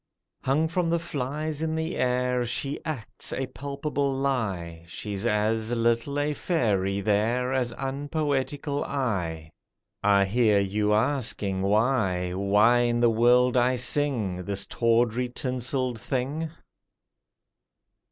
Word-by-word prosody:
Hung 150 +5 +1
from 170 +1 0
the 170 - +2
"flies" 150 -1 -3
in 160 0 -1
air, 125 -6 0
She 135 +4 -2
acts 150 -10 -5
a 135 - -2
palpable 140 +1 -3
lie, 105 -12 -2
She's 100 +4 -4
as 110 +1 0
little 115 +4 +1
a 150 +1 0
fairy 100 - 0
there 115 +5 +1
As 125 -2 0
unpoetical 145 0 -2
I! 90 - -2 0.5
I 100 -1 +4
hear 105 0 +3
you 105 +2 0
asking, 110 -5 0
Why— 100 -4 +1
Why 105 +5 +4
in 120 -1 +1
the 120 -1 +4
world 125 +2 +4
I 125 +1 +3
sing 120 -8 0
This 100 -1 -1
tawdry, 120 +1 +1
tinselled 125 -1 -2
thing? 140 +7 -2
125 Hz, 115 wpm, -26 LUFS, 105-140 Hz, 0.5 s, I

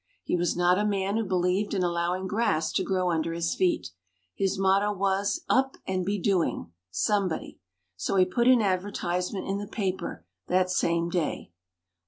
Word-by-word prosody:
He - - 0
was 175 -1 0
not 180 +2 +3
a - - +1
man 200 -1 0
who 225 - +1
believed 185 +2 0
in 185 - +1
allowing 175 +2 -1
grass 190 -6 0
to - - 0
grow 185 -2 0
under 165 0 -1
his 170 0 -1
feet. 180 - 0 0.4
His 195 0 -1
motto 195 +2 +3
was, 200 0 0
"Up 265 +1 +2
and 185 -1 -1
be 200 +3 -1
doing 175 - 0 0.2
somebody." 195 - -1 0.4
So 95 - -1
he 185 -1 +5
put 235 +6 +1
an 250 -3 +6
advertisement 185 -1 -1
in 195 +1 -1
the 205 - -5
paper 190 - -3 0.2
that 185 0 +2
same 170 -1 +1
day. 170 - -2
185 Hz, 170 wpm, -27 LUFS, 175-200 Hz, 0.4 s, an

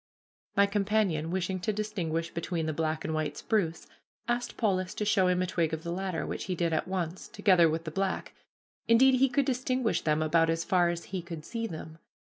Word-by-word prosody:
My 200 - +7
companion, 200 -5 +1
wishing 185 +1 -1
to 180 +5 -1
distinguish 180 -6 -2
between 170 -1 -2
the 155 - -1
black 155 0 -1
and 160 - -2
white 155 -2 -2
spruce, 175 -7 -1 0.4
asked 240 0 -2
Polis 185 -4 0
to 210 - -2
show 190 -3 +3
him 180 0 +2
a - - 0
twig 165 -3 0
of 160 - -10
the 170 - -4
latter, 185 -2 -2
which - - -4
he 185 - -2
did 170 -1 0
at 160 - 0
once, 180 -2 -3
together 180 -5 +4
with 160 +1 -2
the 160 - -5
black; 195 +3 -2 0.5
indeed, 255 +3 +6
he 270 0 +4
could 270 +2 +1
distinguish 255 -2 0
them 155 0 +1
about 165 +1 +3
as 165 0 0
far 175 -2 +3
as 170 -1 -3
he 185 -1 -4
could 165 -3 -8
see 230 -1 -3
them. 160 -3 -8
180 Hz, 210 wpm, -29 LUFS, 165-205 Hz, 0.5 s, My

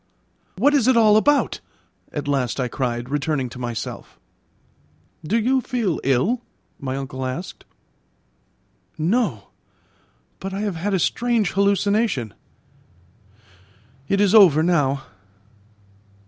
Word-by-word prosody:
"What 280 +9 +3
is 270 -5 +3
it 260 -2 +4
all 215 -2 +5
about?" 285 +6 +2 0.5
at 145 -1 -5
last 135 -3 -1
I 125 - 0
cried, 120 -1 -3
returning 145 -1 -1
to 125 - -10
myself. 120 -2 -6 1.0
"Do 195 +9 0
you 255 +4 +2
feel 235 -10 -2
ill?" 140 - +1 0.4
my 130 -1 -4
uncle 130 -1 -5
asked. 130 +8 -6 1.3
"No; 210 +10 -1 0.9
but 195 0 -5
I 200 - -3
have 205 -5 -2
had 195 +4 -1
a - - +1
strange 230 +1 0
hallucination; 200 - +1 1.7
it 195 - +1
is 205 -1 +3
over 175 -8 +7
now. 140 -6 +1
180 Hz, 115 wpm, -22 LUFS, 135-215 Hz, 1.7 s, over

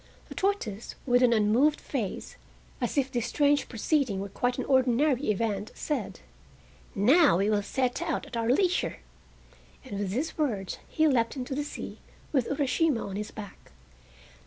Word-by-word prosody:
The - - -7
tortoise, 255 - -2
with 245 -1 +4
an 250 -2 +5
unmoved 230 +7 +3
face, 230 -9 -4 0.5
as 240 +3 -2
if 270 -1 +1
this 240 -1 -1
strange 290 +2 +2
proceeding 245 -3 0
were 200 +1 -4
quite 245 +5 -1
an - - -2
ordinary 260 +1 +2
event, 210 -1 -1
said: 300 - -3 0.7
"Now 265 - +5
we 200 +3 +1
will 205 -1 +2
set 250 +4 -1
out - - -2
at 275 -4 -9
our 230 0 0
leisure," 360 +7 +2 0.9
and 200 - -5
with 200 -2 -2
these 275 - -3
words 210 -11 -1
he 315 0 +3
leapt 235 -4 +2
into 260 0 -4
the 290 +2 -1
sea 295 - -7 0.3
with 265 -5 +1
Urashima 285 -1 +1
on 190 - -6
his 210 +1 -4
back. 205 - -11
245 Hz, 160 wpm, -28 LUFS, 210-285 Hz, 0.9 s, an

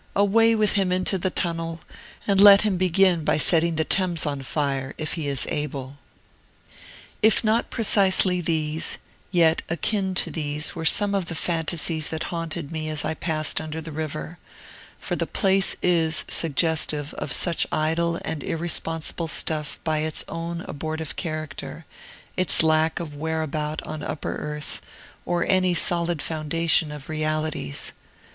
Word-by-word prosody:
Away 225 +3 +4
with 215 -1 +2
him 195 -3 +1
into 185 +1 0
the 185 - 0
Tunnel, 165 -2 -3 0.5
and 200 -1 +3
let 200 0 +9
him 210 -3 +1
begin 180 -1 +2
by - - +1
setting 165 +1 +2
the 160 - +1
Thames 175 -1 0
on 140 -2 -3
fire, 135 -1 -3
if 155 - -3
he 160 -4 -4
is 140 -2 +1
able! 140 -2 -5 1.2
If 220 +1 +4
not 225 +1 +1
precisely 190 -5 +4
these, 155 -1 0 0.3
yet 170 -3 +3
akin 190 +3 -1
to - - +2
these 150 -1 -1
were 165 -2 -6
some 200 +6 +2
of 195 -3 0
the 165 - -5
fantasies 165 -1 -1
that 160 0 -4
haunted 165 -2 -4
me 155 -1 -4
as 155 -1 -2
I 155 - -1
passed 155 -2 0
under 155 0 -6
the 160 0 -7
river: 155 +2 -6 0.6
for - - -4
the - - -2
place 195 -1 +2
is 160 -3 +2
suggestive 155 -1 0
of 140 - -5
such 170 +3 +1
idle 165 +2 0
and 160 -2 -4
irresponsible 165 0 0
stuff 155 -1 0
by 155 -1 0
its 155 0 -1
own 170 +1 -5
abortive 160 -1 -5
character, 155 -1 -6 0.5
its 185 -3 +4
lack 160 0 +2
of 155 -4 -7
whereabout 155 0 -3
on 155 -1 -7
upper 150 - -4
earth, 150 0 -5 0.5
or 175 -1 0
any 185 -2 +2
solid 170 -2 +3
foundation 160 0 +1
of 150 -2 -9
realities. 155 - -1
160 Hz, 150 wpm, -24 LUFS, 155-175 Hz, 1.2 s, let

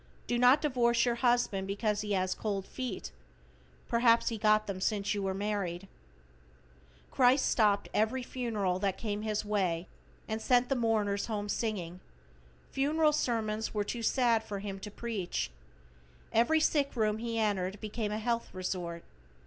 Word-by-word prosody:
Do 240 - 0
not 250 +5 +6
divorce 240 -5 +2
your 240 - +2
husband 240 -6 +2
because 205 +1 -1
he 210 -1 -2
has 185 -1 +1
cold 200 -3 -3
feet, 255 - -5 0.8
perhaps 235 0 +4
he 225 -2 -4
got 215 0 +4
them 195 -2 -5
since 205 0 0
you 205 - -2
were 190 -1 -1
married. 195 -3 -3 1.2
Christ 260 +1 +4
stopped 210 -3 +2
every 230 +4 +1
funeral 215 -8 -2
that 195 -1 -1
came 210 -2 -3
his 215 -1 -2
way 185 -5 0 0.4
and 220 0 -3
sent 245 +1 +3
the 270 - +2
mourners 215 -4 0
home 210 -2 -3
singing. 190 -5 -3 0.7
Funeral 300 +3 +2
sermons 220 -6 -1
were 210 - +1
too 235 +3 -4
sad 230 -1 +2
for 205 -2 -5
Him 195 -1 -5
to 210 - -7
preach. 205 - -3 0.8
Every 240 +8 +4
sick 290 -3 +1
room 215 -2 +1
He 230 0 -3
entered 200 -3 0
became 215 0 -3
a 210 - -1
health 235 +1 -1
resort. 180 -2 -4
215 Hz, 155 wpm, -31 LUFS, 200-235 Hz, 1.2 s, not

